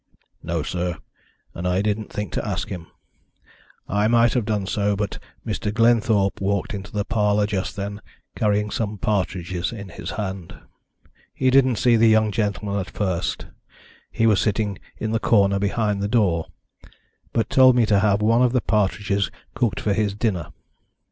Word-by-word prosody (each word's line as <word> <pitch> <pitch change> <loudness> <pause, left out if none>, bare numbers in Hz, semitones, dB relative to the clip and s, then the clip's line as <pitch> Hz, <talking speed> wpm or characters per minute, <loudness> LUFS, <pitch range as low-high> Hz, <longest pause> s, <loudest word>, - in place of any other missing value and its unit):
"No, 85 -2 -2
sir, 90 +1 -3 0.6
and 90 +2 -4
I 90 +2 +1
didn't 105 0 -2
think 105 -4 -4
to - - -2
ask - - -3
him. 85 -4 -6 1.0
I 105 +1 +1
might 115 0 +4
have 125 -4 0
done 105 -3 -1
so, 100 +1 0
but 105 0 -3 0.3
Mr. 105 - -2
Glenthorpe 110 -4 +2
walked 100 +2 -1
into 100 0 -7
the 105 -1 -2
parlour 105 -2 +2
just 100 -3 -3
then, 100 +1 -5 0.3
carrying 105 0 +1
some 105 -2 -2
partridges 95 -3 -2
in 100 -4 -8
his - - -7
hand. 95 -3 -5 0.8
He 130 -1 +2
didn't 130 -2 +4
see 120 +2 +3
the 115 +1 +5
young 110 -1 +4
gentleman 100 -1 -1
at 95 - -5
first 95 -4 -2 0.7
he 115 - +1
was 105 -3 +4
sitting 105 -2 -1 0.2
in 110 - -3
the 115 - +1
corner 100 -4 +3
behind 100 0 0
the 100 - 0
door 100 -8 +1 0.8
but 115 - 0
told 130 -1 +6
me 120 -2 +4
to 105 -2 +3
have 105 0 +2
one 115 +3 +4
of 125 -1 +3
the 125 - +2
partridges 100 -2 0 0.2
cooked 115 -8 0
for 105 - 0
his 105 -1 0
dinner. 100 -8 -1
105 Hz, 170 wpm, -23 LUFS, 100-110 Hz, 1.0 s, told